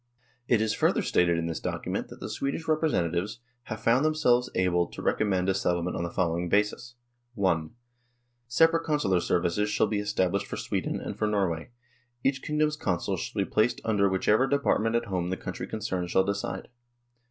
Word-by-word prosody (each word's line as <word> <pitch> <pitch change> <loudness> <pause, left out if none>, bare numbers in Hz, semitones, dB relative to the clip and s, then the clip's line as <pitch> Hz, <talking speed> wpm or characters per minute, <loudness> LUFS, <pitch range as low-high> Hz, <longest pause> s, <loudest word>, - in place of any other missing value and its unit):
It 115 -3 +3
is 110 -1 +1
further - - +2
stated 85 -1 +2
in 85 - -1
this 80 -1 -3
document - - -3
that - - -12
the - - -5
Swedish 140 +4 -3
representa 155 - +1
tives 95 +6 -2
" 125 -1 -45
have 110 -1 -5
found 120 +4 +4
themselves 125 -6 +3
able 90 -2 +2
to - - -11
recommend 95 -4 +1
a 95 - +3
settlement 90 -2 0
on - - -2
the 85 - -2
following 85 0 -1
basis: 105 +5 0 0.4
"(i) 85 -5 +2 0.8
Separate 165 +6 +3
Consular 145 - +1
services 90 +4 0
shall 105 - +2
be 105 -1 -1
estab 95 -3 0
lished 100 0 -1
for - - -5
Sweden - - -2
and - - -5
for 110 - +1
Norway. 95 -5 -1 0.5
Each 135 0 +1
king 150 - -3
dom's 150 0 +2
Consuls 90 - -1
shall 100 - -2
be - - -17
placed 110 +3 +2
under 100 -3 +3
whichever 105 +7 +3
department 130 -5 +1
at 115 - +1
home 90 -3 -2
the 95 - -2
country - - -6
concerned 95 -5 -3
shall 95 - +3
decide. 100 +1 -3
100 Hz, 190 wpm, -28 LUFS, 90-120 Hz, 0.8 s, found